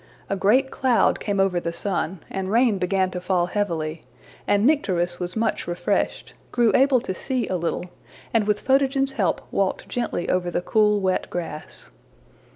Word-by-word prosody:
A - - +2
great 245 +8 +3
cloud 255 -3 +2
came 200 -2 -2
over 190 -2 +2
the 170 -1 -3
sun, 175 -1 -3
and 190 -1 -4
rain 230 -2 +3
began 185 0 +1
to 180 - -5
fall 180 -1 +1
heavily, 165 -5 -2 0.5
and 205 +1 +3
Nycteris 180 - +1
was 180 0 -4
much 225 -4 -1
refreshed, 175 0 -1 0.2
grew 240 -2 +3
able 265 -1 +5
to 190 - -4
see 255 +5 -2
a 185 - -1
little, 170 0 -2 0.5
and 220 -3 +2
with 210 -1 +1
Photogen's 270 0 +2
help 205 -9 0
walked 195 -1 -1
gently 235 -7 -2
over 180 -1 0
the 175 0 -2
cool 210 0 +3
wet 185 -1 -1
grass. 165 -3 -7
195 Hz, 165 wpm, -23 LUFS, 180-230 Hz, 0.5 s, able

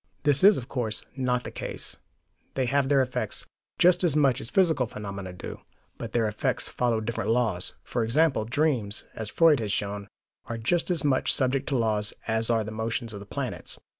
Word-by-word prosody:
This 145 0 +3
is, 205 +1 +8
of 125 - -6
course, 115 -6 -2
not 125 -2 0
the - - -6
case: - - -5 0.6
they 130 - +1
have 135 +1 +1
their 140 -2 +5
effects, 125 0 -3 0.3
just 180 +1 +4
as 165 -5 +2
much 140 -5 +3
as 115 - -4
physical 160 -9 +2
phenomena 100 -3 -6
do, 90 - -8 0.4
but - - -5
their 115 -2 +1
effects 105 0 -1
follow 120 -2 0
different 115 +1 -3
laws. 110 -7 +1
For 120 - -1
example, 130 0 +2
dreams, 120 -5 0
as 110 -2 -5
Freud 160 -1 +5
has 105 -3 -2
shown, 100 0 -2 0.4
are 115 - -4
just 165 +12 0
as 175 -3 +2
much 140 -3 +2
subject 135 +1 0
to 135 - +1
laws 105 -3 +1
as 110 +1 +2
are 115 -2 +2
the 105 - -6
motions 110 +1 -2
of 100 - -6
the 100 - -11
planets. - - -5
120 Hz, 195 wpm, -27 LUFS, 110-140 Hz, 0.6 s, is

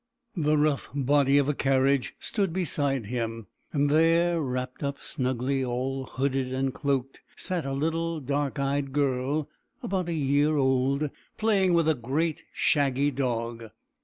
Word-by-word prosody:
The 155 -3 +2
rough 150 -2 +1
body 140 0 +3
of 140 -1 +3
a 145 - +2
carriage 135 -1 +1
stood 200 -5 -1
beside 145 - 0
him, 115 -1 -3 0.3
and 145 -1 +2
there, 165 +3 +3
wrapped 125 -2 -3
up 140 -1 -2
snugly, 130 -1 -1
all 130 +2 -2
hooded 135 -1 -1
and 130 0 -1
cloaked, 135 -2 -2
sat 175 -6 -3
a 135 - -2
little 165 +3 -1
dark 140 +1 -2
eyed 140 0 -1
girl, 140 +1 0 0.4
about 185 -2 -1
a - - -1
year 145 +1 +2
old, 135 +2 +1 0.3
playing 195 -5 +3
with 165 -2 +3
a 160 - +5
great, 150 +6 -1
shaggy 140 -1 +2
dog. 115 -3 -3
140 Hz, 145 wpm, -27 LUFS, 130-155 Hz, 0.4 s, a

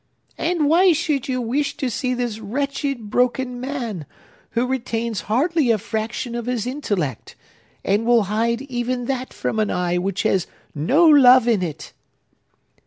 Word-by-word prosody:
"And 330 -3 +1
why 350 +4 +5
should 300 -4 -1
you 255 -1 -1
wish 260 +5 -1
to 280 -3 -1
see 255 +1 -1
this 240 -3 -3
wretched, 275 0 -3
broken 250 0 0
man, 240 - -4 0.5
who 235 +2 +1
retains 235 -5 -2
hardly 290 +4 +2
a 225 - +4
fraction 225 +3 -4
of 240 0 -4
his 245 -3 -1
intellect, 205 - -3 0.5
and 205 +3 +2
will 235 -1 +4
hide 230 +5 -1
even 245 -2 -3
that 260 0 -3
from 220 - -3
an 215 - +1
eye 180 0 0
which 195 +1 -2
has 185 -3 +1 0.3
no 255 - +3
love 260 -5 +7
in 225 -5 +2
it?" 155 -3 -5
240 Hz, 155 wpm, -21 LUFS, 215-270 Hz, 0.5 s, love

